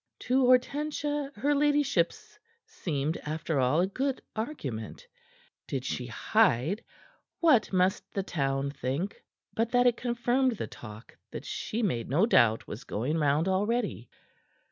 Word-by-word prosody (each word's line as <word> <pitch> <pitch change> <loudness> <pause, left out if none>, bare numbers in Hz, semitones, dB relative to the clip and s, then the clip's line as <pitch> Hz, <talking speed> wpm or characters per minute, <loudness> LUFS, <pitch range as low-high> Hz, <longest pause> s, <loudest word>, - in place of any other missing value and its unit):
To 255 0 +2
Hortensia 290 +2 +1
her 290 +1 +1
ladyship's 285 - +1 0.3
seemed, 150 -1 -2
after 155 -1 -2
all, 130 +6 +3
a - - +3
good 265 +7 -2 0.2
argument. 145 - -5 0.6
Did - - -3
she - - -3
hide, 155 - +2 0.6
what 295 -10 +4
must 185 0 +1
the 195 - -2
town 140 -5 -1
think 140 +8 -3 0.3
but 225 +1 0
that 245 0 +4
it 245 -1 +4
confirmed 245 +2 +1
the 220 - -4
talk 110 -1 -11
that - - -7
she 230 +2 -3
made 120 - -1
no 160 +10 +4
doubt 115 - +3
was 110 +6 -7
going 135 +7 -2
round 150 +3 +2
already. 205 - 0
190 Hz, 135 wpm, -29 LUFS, -, 0.6 s, what